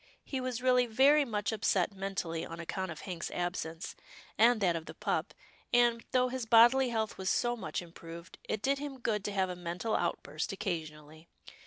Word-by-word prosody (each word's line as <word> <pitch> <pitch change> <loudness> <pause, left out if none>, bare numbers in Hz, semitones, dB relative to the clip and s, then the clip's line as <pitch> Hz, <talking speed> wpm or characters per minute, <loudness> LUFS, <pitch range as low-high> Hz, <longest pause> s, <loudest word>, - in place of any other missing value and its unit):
He 265 -2 -3
was 255 -1 -3
really 250 -1 +4
very 275 +6 +5
much 210 -4 -1
upset 205 -3 +1
mentally 190 -4 -3
on 165 0 -7
account 190 +3 -3
of 160 - -7
Hank's 175 -3 -5
absence, 175 -2 -4 0.4
and 230 +1 +5
that 180 -4 +2
of 165 -1 -5
the - - -8
pup, - - -2 0.4
and, 240 -1 +4
though 255 0 +3
his 255 -2 -4
bodily 240 +3 +6
health 220 -3 -2
was 190 0 -1
so 240 0 +1
much 225 - -4
improved, 170 0 -11
it 215 - -2
did 275 +1 +2
him 285 -2 -5
good 215 -4 -1
to 205 - -1
have 190 -2 0
a - - -5
mental 180 +5 -3
outburst - - -2
occasionally. 160 -5 -5
210 Hz, 185 wpm, -32 LUFS, 175-240 Hz, 0.4 s, bodily